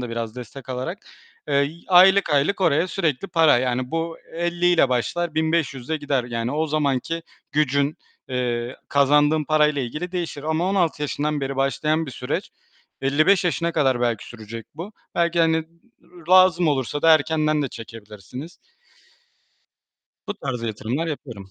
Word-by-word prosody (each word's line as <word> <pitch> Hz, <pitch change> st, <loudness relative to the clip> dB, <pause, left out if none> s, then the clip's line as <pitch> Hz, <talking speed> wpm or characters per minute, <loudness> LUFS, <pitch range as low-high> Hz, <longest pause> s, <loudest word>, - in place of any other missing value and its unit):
da 125 Hz, -2 st, -5 dB
biraz 115 Hz, 0 st, -4 dB
destek 125 Hz, +1 st, -9 dB
alarak, 130 Hz, +9 st, -4 dB, 0.5 s
eee, 145 Hz, -, 0 dB
y 140 Hz, +3 st, +1 dB
aylık, 190 Hz, +1 st, +6 dB
aylık 150 Hz, +8 st, +2 dB
oraya 165 Hz, -1 st, +3 dB
sürekli 170 Hz, -1 st, -1 dB
para. 160 Hz, -7 st, +4 dB
Yani, 125 Hz, 0 st, -1 dB
bu 165 Hz, 0 st, -2 dB, 0.2 s
50'yle 175 Hz, -2 st, +2 dB
başlar, 155 Hz, +7 st, -1 dB
1.500'le 160 Hz, -3 st, 0 dB
gider. 140 Hz, -4 st, -1 dB
Yani, 115 Hz, 0 st, -3 dB
o 155 Hz, +2 st, 0 dB
zamanki 150 Hz, +2 st, -1 dB, 0.3 s
gücün, 140 Hz, 0 st, +1 dB, 0.3 s
eee, 120 Hz, -1 st, -2 dB
kazandığın 145 Hz, +2 st, +3 dB
parayla 150 Hz, -2 st, +2 dB
ilgili 150 Hz, +9 st, -5 dB
değişir 170 Hz, -5 st, -4 dB
ama 160 Hz, +4 st, 0 dB
16 175 Hz, -6 st, 0 dB
yaşından 150 Hz, 0 st, -1 dB
beri 135 Hz, 0 st, -3 dB
başlayan 150 Hz, +4 st, 0 dB
bir 135 Hz, -, -6 dB
süreç, 125 Hz, 0 st, -4 dB, 0.5 s
55 155 Hz, +8 st, +3 dB
yaşına 170 Hz, -1 st, 0 dB
kadar 135 Hz, -6 st, +1 dB
belki 120 Hz, -3 st, 0 dB
sürecek 115 Hz, -1 st, -9 dB
bu. 170 Hz, +7 st, -7 dB, 0.2 s
Belki, 170 Hz, 0 st, +1 dB
hani, 160 Hz, -1 st, +2 dB, 0.6 s
lazım 185 Hz, -2 st, +6 dB
olursa 140 Hz, +1 st, -1 dB
da 165 Hz, -1 st, +7 dB
erkenden 155 Hz, 0 st, +1 dB
de 135 Hz, -, -2 dB
çekebilirsiniz. 115 Hz, -, -10 dB, 1.7 s
Bu 205 Hz, -, -2 dB
tarz 130 Hz, -, -5 dB
yatırımlar 115 Hz, +7 st, -3 dB
yapıyorum. 120 Hz, -11 st, -7 dB
150 Hz, 140 wpm, -23 LUFS, 125-165 Hz, 1.7 s, da